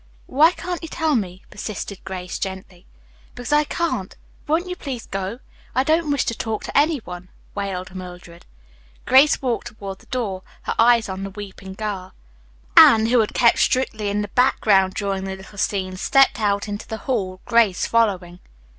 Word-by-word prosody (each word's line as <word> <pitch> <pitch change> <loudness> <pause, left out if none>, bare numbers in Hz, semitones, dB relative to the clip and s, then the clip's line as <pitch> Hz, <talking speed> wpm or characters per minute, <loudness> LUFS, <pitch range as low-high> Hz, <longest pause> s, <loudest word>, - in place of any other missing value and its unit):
"Why 310 +6 +5
can't 355 -1 -5
you 330 - -6
tell 315 -3 0
me?" 190 -4 -3
persisted 205 -2 -6
Grace 180 -1 -6
gently. 190 -1 -7 0.5
"Because 245 +4 -3
I 300 0 +4
can't. 295 - -2 0.3
Won't 325 +5 +1
you 360 - -4
please 260 -9 -6
go. 195 +3 -4 0.4
I 260 - +3
don't 315 +2 +1
wish 285 - +1
to - - -1
talk 220 -1 -3
to - - -7
any 300 +2 +4
one," 180 0 -9 0.2
wailed 190 -2 -4
Mildred. 180 -2 -10 0.6
Grace 270 +3 +5
walked 240 -2 -1
toward 200 -4 -8
the - - -21
door, 220 -8 -3 0.2
her - - -2
eyes 235 0 +5
on 190 0 -5
the 195 - -4
weeping 195 -1 -9
girl. 195 -3 -5 0.6
Anne, 220 -1 +8
who 240 +2 +3
had 215 - 0
kept 235 -2 +4
strictly 220 -5 +1
in 205 +1 -1
the 205 - -6
background 195 -6 +3
during 195 -1 -2
the 190 0 -4
little 190 +1 -12
scene, 190 -3 -1
stepped 270 +7 +3
out 200 -1 0
into 205 +1 -6
the 220 - -4
hall, 190 -8 -2
Grace 230 -6 +3
following. 190 -6 0
210 Hz, 175 wpm, -22 LUFS, 190-250 Hz, 0.6 s, Anne